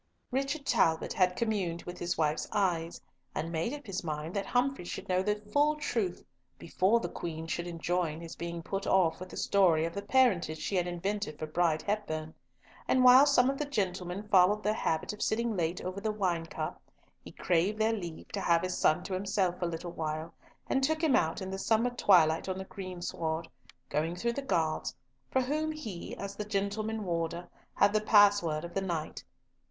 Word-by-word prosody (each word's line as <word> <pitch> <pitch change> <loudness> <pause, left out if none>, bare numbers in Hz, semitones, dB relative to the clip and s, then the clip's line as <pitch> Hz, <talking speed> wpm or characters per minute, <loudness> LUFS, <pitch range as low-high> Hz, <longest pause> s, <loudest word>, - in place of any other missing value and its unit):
Richard 275 +3 -1
Talbot 160 -10 +2
had 180 -1 +2
communed 195 -7 -1
with 175 0 -8
his 175 0 -2
wife's 155 -1 0
eyes, 175 -5 0 0.4
and 160 +2 -2
made 165 +7 -1
up 290 -1 -7
his 195 -3 -4
mind 155 +2 -4
that 200 - -2
Humfrey 255 -3 +1
should 175 - -6
know 185 0 +2
the 210 +2 +1
full 285 +9 +1
truth 225 -11 -2 0.3
before 190 +7 +2
the - - -3
Queen 160 -1 -5
should 170 +1 -3
enjoin 170 -1 -1
his 165 -1 -8
being 170 0 -5
put 195 +3 -3
off 170 -4 +3
with 185 0 -8
the - - -9
story 175 -5 +3
of 165 - -4
the 200 - -3
parentage 205 -9 +2
she 155 +6 -3
had 180 -1 +1
invented 175 -2 -3
for 155 - -4
Bride 155 0 +1
Hepburn; 160 -7 -3 0.5
and 255 - +3
while 255 +3 +9
some 255 -3 +5
of 275 0 -1
the 295 - 0
gentlemen 195 -5 -3
followed 205 +2 +4
their 210 - +2
habit 160 -4 -1
of 210 - -10
sitting 230 0 0
late 170 0 -1
over 185 +2 -5
the 215 - 0
wine 180 -6 -1
cup, - - -5 0.4
he - - -10
craved 180 +5 +1
their 220 +1 +2
leave 175 -7 -6
to 200 - -3
have 170 -1 +3
his 185 0 -1
son 155 - +2
to 195 - -5
himself 185 -1 0
a 175 - +1
little 170 +1 -5
while, 160 0 -4 0.3
and 270 - +1
took 315 +4 0
him 305 -5 +4
out 165 +4 +1
in 190 - -5
the 195 - -4
summer 225 +4 +2
twilight 175 -8 +4
on 185 - -2
the 190 - -4
greensward, 175 -4 -4 0.4
going 165 +3 -1
through 235 +6 -1
the 280 - -3
guards, 165 - -1 0.3
for 260 - +2
whom 305 +4 -1
he, 225 - -7
as 200 0 -6
the 210 - -3
gentleman 210 +2 -2
warder, 170 -1 -2 0.3
had 200 0 +4
the 215 - +2
password 205 -7 +4
of 170 - -9
the 195 - 0
night. 170 -5 -4
185 Hz, 200 wpm, -30 LUFS, 170-215 Hz, 0.5 s, while